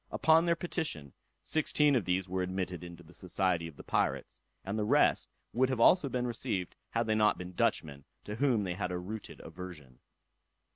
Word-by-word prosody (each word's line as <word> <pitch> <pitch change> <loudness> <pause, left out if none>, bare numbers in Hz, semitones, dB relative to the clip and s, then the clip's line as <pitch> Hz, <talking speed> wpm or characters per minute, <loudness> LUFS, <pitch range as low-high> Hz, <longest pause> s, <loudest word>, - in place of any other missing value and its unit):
Upon 160 +1 +4
their 170 -1 +3
petition, 155 - -3 0.3
sixteen 150 -2 +3
of 115 -7 +1
these 95 +1 0
were 95 +1 -2
admitted 90 -2 -3
into 85 0 -10
the 85 +2 -17
society 90 -2 0
of 80 - -11
the - - -10
pirates; - - -1 0.3
and 100 +2 -3
the 110 - 0
rest 105 - +3 0.2
would 130 +2 +2
also 155 +5 +6
have - - -7
been 125 -1 -1
received, 115 -6 -2
had 115 0 0
they 110 - +1
not 105 -1 +3
been 90 +1 -7
Dutchmen, 70 -4 0 0.2
to 105 - -6
whom 125 -5 +2
they 90 -2 -2
had 90 0 -3
a 90 - -2
rooted 105 +5 -7
aversion. 75 -9 -10
95 Hz, 190 wpm, -31 LUFS, 90-125 Hz, 0.3 s, also